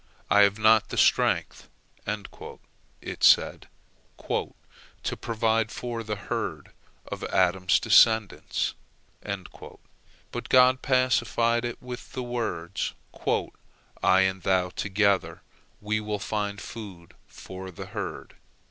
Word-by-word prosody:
"I 105 - +6
have 100 0 +4
not 110 0 +4
the - - -5
strength," - - +2 0.4
it 105 -1 -8
said, - - +4 0.6
"to - - -5
provide 115 -1 0
food - - -9
for 120 -2 -4
the 105 -1 -3
herd 100 -1 -4 0.3
of - - -7
Adam's 95 0 +2
descendants." 110 -4 +3 1.6
But - - -6
God 130 0 +5
pacified 120 -2 +2
it 120 -1 -4
with 125 -1 -8
the 130 - -3
words, 105 -8 -3 1.1
"I 95 +1 +5
and 95 0 0
thou 90 -1 +1
together, 100 +1 0 0.4
we 105 +1 -1
will 105 -1 -3
find 105 0 -3
food 100 -6 -9
for 95 0 -9
the 90 - -8
herd." - - -6
105 Hz, 110 wpm, -26 LUFS, 95-115 Hz, 1.6 s, I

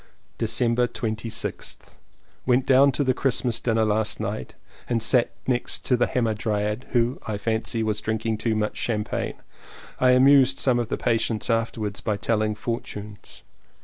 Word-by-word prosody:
December 115 +2 +2
26th. 110 -1 -5 0.6
Went 125 +1 +3
down 135 +1 +5
to 145 - 0
the 130 -1 +2
Christmas 125 -3 0
dinner 115 -2 +1
last 105 0 0
night 65 - -4 0.3
and 120 -2 +1
sat 120 +2 +3 0.2
next 125 -2 -1
the 120 -2 +3
Hamadryad, 105 -1 -1
who, 120 0 +1
I 105 -2 -2
fancy, 110 +1 -1
was 105 -1 -1
drinking 110 0 -2
too 110 0 0
much 105 0 -1
cham 105 -3 0
pagne. - - -3 0.6
I 125 0 +5
amused 135 0 +5
some 125 -3 +2
of 120 - -1
the - - -1
patients 115 0 0
afterwards 115 -2 -2
by 105 -2 -1
telling 110 0 0
fortunes. 105 -3 -6
115 Hz, 145 wpm, -24 LUFS, 110-125 Hz, 0.6 s, down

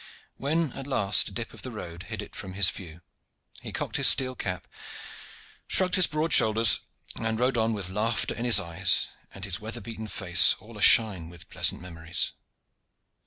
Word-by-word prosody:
When 155 0 -2
at 135 0 -9
last 105 -7 +2
a - - -7
dip 115 +4 -6
of - - -12
the 130 - -8
road 90 -7 -9
hid 105 -2 -6
it - - -14
from 95 -2 -9
his 95 -2 +4
view, 85 -2 -12 0.6
he - - -8
cocked - - -4
his - - +4
steel 130 -1 +4
cap, 90 -7 -5 1.0
shrugged 185 -1 +3
his 185 -2 +4
broad 155 +1 -1
shoulders, 110 0 +5 0.4
and 110 0 -3
rode 125 +1 0
on 115 -1 0
with 100 -4 -5
laughter 110 +4 -1
in 115 - -6
his 115 -5 +6
eyes, 90 0 +2 0.2
and 100 0 -6
his 95 -1 -2
weather 110 +2 -5
beaten 110 -2 -9
face 90 -4 +2
all 110 +4 -16
ashine 100 -5 +3
with 85 -1 -12
pleasant - - -1
memories. 85 -2 -4
105 Hz, 180 wpm, -25 LUFS, 90-120 Hz, 1.0 s, his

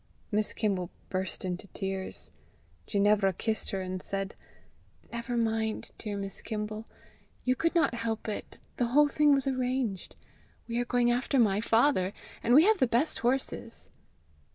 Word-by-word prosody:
Miss 210 0 +1
Kimble 190 -5 -1 0.2
burst 185 0 -2
into 180 +2 -4
tears. 190 -1 -4 0.6
Ginevra 200 -1 +3
kissed 220 +4 -1
her, 195 - -2
and 185 0 -4
said, 195 0 -3 0.8
"Never 235 +1 -3
mind, 220 -1 0
dear 210 -2 -4
Miss 195 -1 -4
Kimble. 215 0 -4 0.6
You 255 0 +2
could 330 +6 0
not 325 -8 +3
help 230 -2 -2
it. 210 - -5 0.2
The 245 - +2
whole 295 0 +7
thing 295 +1 +4
was 275 -2 +3
arranged. 255 -6 -1 0.5
We 235 0 -1
are 245 - 0
going 240 0 +3
after 250 +3 +1
my 210 -4 +4
father, 225 -5 +3 0.3
and 240 - +4
we 310 +4 +8
have 435 -1 +4
the 260 - +4
best 240 +7 +2
horses." 245 -1 -1
225 Hz, 155 wpm, -30 LUFS, 200-250 Hz, 0.8 s, we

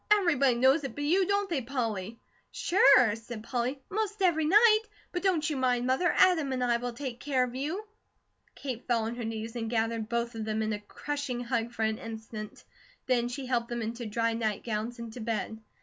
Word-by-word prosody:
"Everybody 300 - +4
knows 265 +5 +4
it 270 -4 -5
but 290 - -3
you, 360 +5 +3
don't 405 0 +1
they, 330 -7 -1
Polly?" 230 -5 -3 0.3
"Sure!" 260 - +5
said 225 -1 -8
Polly. 255 +3 -2
"Most 425 0 -2
every 320 -4 +3
night; 430 +6 +6 0.3
but 355 - -2
don't 355 -6 +2
you 305 - -1
mind, 250 -2 +1
Mother, 265 +8 +2
Adam 325 -7 +4
and 255 -1 -1
I 240 -1 +2
will 245 0 -4
take 250 -1 -6
care 265 -2 +1
of 245 -1 -4
you." 310 +11 -3 0.7
Kate 255 -4 -6
fell 235 -2 +2
on 225 +1 -2
her 240 0 -5
knees 225 +1 -4
and 225 -2 -3
gathered 225 -1 -1
both 235 0 -1
of 225 -1 -4
them 220 0 -1
in 215 0 -1
a 210 - -3
crushing 270 +3 -4
hug 235 -1 -1
for 225 -2 -3
an 220 0 0
instant; 220 -1 -8 0.4
then 245 -2 +2
she 260 +2 -5
helped 240 -2 0
them 240 -1 -3
into 230 +2 -4
to - - -5
dry 230 +1 0
nightgowns 220 +1 -2
and 230 -1 -7
to 250 - -8
bed. 220 -1 -3
245 Hz, 210 wpm, -29 LUFS, 225-285 Hz, 0.7 s, night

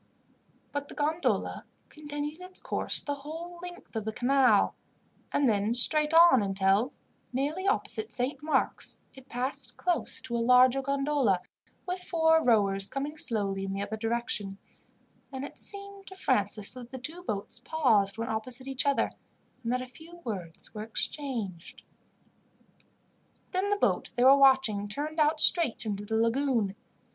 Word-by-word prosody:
But 285 0 -4
the - - -11
gondola 310 +3 -1 0.3
continued 295 +2 -6
its 365 0 -6
course - - -2
the 285 - -2
whole 325 +5 -8
length 355 -7 -10
of 220 - -2
the 220 - -3
canal, 250 -2 +3 0.6
and 285 - +2
then 215 +1 +1
straight 300 +5 +5
on 330 -7 +7
until, 195 +5 +1 0.4
nearly 295 +9 -2
opposite 425 +1 0
Saint 260 +3 -2
Mark's, 310 +1 -1
it 265 -1 -16
passed 250 +3 -5
close 355 -2 -1
to 235 - -5
a - - 0
larger 250 +2 +5
gondola, 275 -8 +1 0.4
with 365 +1 -3
four 320 -2 +2
rowers, 200 -4 +2
coming 285 +2 -4
slowly 200 -9 +1
in 195 0 -4
the 195 +1 -3
other 220 - -4
direction; 225 -3 -2 0.7
and 265 0 -5
it - - -11
seemed 400 -1 -7
to 380 - -9
Francis 210 - +2
that 245 -2 -10
the 260 - -6
two 315 +8 -7
boats 205 - -4
paused 220 -11 +1
when 230 0 -3
opposite 240 +4 -3
each 270 +1 0
other, 280 - +1 0.5
and 230 - -2
that 255 0 -1
a - - -7
few 320 +7 -14
words 185 -8 -7
were 210 - -6
exchanged. 220 - -4 1.7
Then 380 +2 -1
the 410 - +2
boat - - 0
they 245 - +3
were 265 +2 +8
watching 265 -7 +4
turned 300 +9 -4
out 305 +1 +3
straight 315 -9 +6
into 205 -1 -4
the 220 +1 -2
lagoon. 230 -3 +1
260 Hz, 155 wpm, -28 LUFS, 220-305 Hz, 1.7 s, were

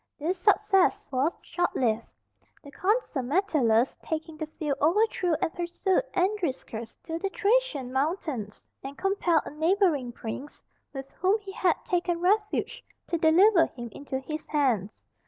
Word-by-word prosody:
This 345 +5 -2
success 405 0 +3
was 270 +5 +1
short 350 - -1
lived. 230 -3 0 0.6
The 285 - -12
Consul 400 - 0
Metellus 260 - +2
taking 320 0 -4
the 310 0 -5
field 300 -3 -3
overthrew 360 +1 +2
and 325 - -1
pursued 355 +2 0
Andriscus 340 - -2
to 325 0 -4
the 390 - -2
Thracian 400 - 0
mountains, 270 - -2 0.2
and 275 +1 -7
compelled 370 -5 +1
a - - -7
neighbouring 315 - +1
prince, 245 +5 -7 0.3
with 270 -1 -7
whom 385 +5 +3
he 395 -1 -8
had 365 -3 +2
taken 350 -1 0
refuge, 420 +6 0 0.3
to 340 - 0
deliver 335 +2 +5
him 240 -1 -8
into 275 +1 -5
his 305 +4 -6
hands. 245 -9 0
320 Hz, 140 wpm, -27 LUFS, 270-385 Hz, 0.6 s, deliver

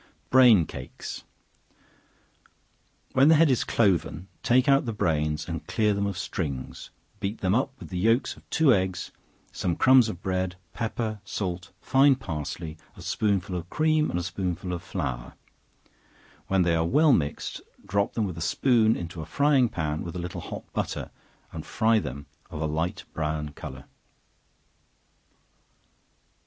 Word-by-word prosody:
Brain 120 -9 +7
Cakes. 65 - -8 1.9
When 135 +2 +5
the 160 - +7
head 155 -2 +5
is 125 - +2
cloven, 90 -5 +1
take 130 +3 +3
out 135 -1 +4
the 115 - -1
brains 75 -5 0
and - - -5
clear 105 -1 +2
them 100 0 0
of 100 -2 -4
strings, 70 -8 -4 0.3
beat 105 +1 -3
them 95 0 +2
up 135 +3 0
with - - -10
the 90 - -3
yelks 115 +6 +2
of - - -20
two 155 -5 +4
eggs, 95 -2 -1 0.4
some 85 -2 -1
crumbs 130 -3 +6
of 90 -3 -7
bread, 95 -1 -1 0.2
pepper, 110 -2 -3
salt, 90 -2 -4
fine 135 +1 +5
parsley, 80 - -5 0.2
a - - -10
spoonful 100 -3 0
of 85 0 -5
cream, 155 +2 +2
and - - -2
a - - -3
spoonful 90 0 -3
of 85 - -4
flour; - - -4 1.1
when 95 -1 +3
they 85 -1 +2
are 80 0 +2
well 150 - +5
mixed, 75 -8 -1 0.2
drop 100 +2 0
them 110 - 0
with 90 -4 -5
a - - -6
spoon 115 - +3
into 85 -1 -6
a - - -6
frying 140 -4 +3
pan 75 -4 -2
with 85 0 -6
a - - -3
little 90 +1 -5
hot - - -7
butter, - - -3 0.4
and - - -6
fry 110 0 +2
them 70 -6 -6 0.2
of 80 -4 -7
a 80 - -1
light 80 +6 -2
brown 75 -1 -2
color. 70 -2 -9
95 Hz, 155 wpm, -26 LUFS, 80-115 Hz, 1.9 s, Brain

